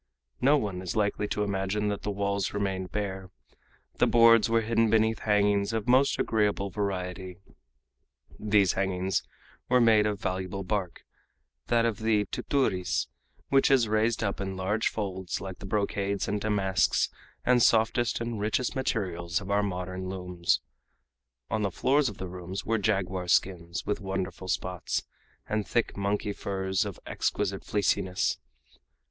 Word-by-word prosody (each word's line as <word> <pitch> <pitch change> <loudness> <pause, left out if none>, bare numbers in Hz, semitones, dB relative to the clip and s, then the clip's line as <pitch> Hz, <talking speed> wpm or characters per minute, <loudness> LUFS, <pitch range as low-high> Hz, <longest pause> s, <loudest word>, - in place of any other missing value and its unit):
No 140 +4 +5
one 100 -8 -3
is 90 - -4
likely 105 -1 0
to 105 - -1
imagine 100 +1 -1
that 100 - -3
the - - -3
walls 100 -1 -1
remained 95 -2 -2
bare. 95 -3 -4 0.7
The - - +4
boards 115 -1 +6
were 115 0 +3
hidden 115 0 +2
beneath 110 0 +2
hangings 105 0 +2
of 110 0 -2
most 130 +3 +4
agreeable 105 -3 0
variety. 95 -2 -3 1.0
These 105 -3 +3
hangings 95 -1 0 0.5
were 125 0 +5
made 110 -3 +5
of 105 -2 -2
valuable 95 +1 -3
bark, 95 -2 -3 0.6
that 115 -1 +3
of 115 -1 -1
the 110 -2 +2
"tuturis," 90 - 0 0.4
which 135 +1 +4
is 130 -5 +4
raised 110 +2 +1
up 100 -1 -2
in 95 -1 -4
large 105 +4 0
folds 95 -4 -3
like 95 -2 -7
the 95 - -8
brocades 100 -1 -1
and 105 0 -1
damasks 100 -3 +1 0.3
and 125 -1 +4
softest 115 +1 +3
and 115 -2 -3
richest 110 +6 0
materials 95 -9 -1
of 100 0 -6
our 100 +1 +3
modern 90 -1 -4
looms. 90 -2 -1 0.9
On 110 - 0
the 100 - +1
floors 135 - +2
of 100 - -10
the 95 - -5
rooms 90 +2 -6
were 115 0 +1
jaguar 95 -3 -1
skins, 85 -1 0
with 105 - -2
wonderful 95 -1 -4
spots, - - -2 0.4
and 105 -1 -1
thick 120 - 0
monkey 100 +1 -1
furs 95 -1 -1
of - - -6
exquisite - - -2
fleeciness. 100 -1 0
100 Hz, 150 wpm, -28 LUFS, 95-110 Hz, 1.0 s, boards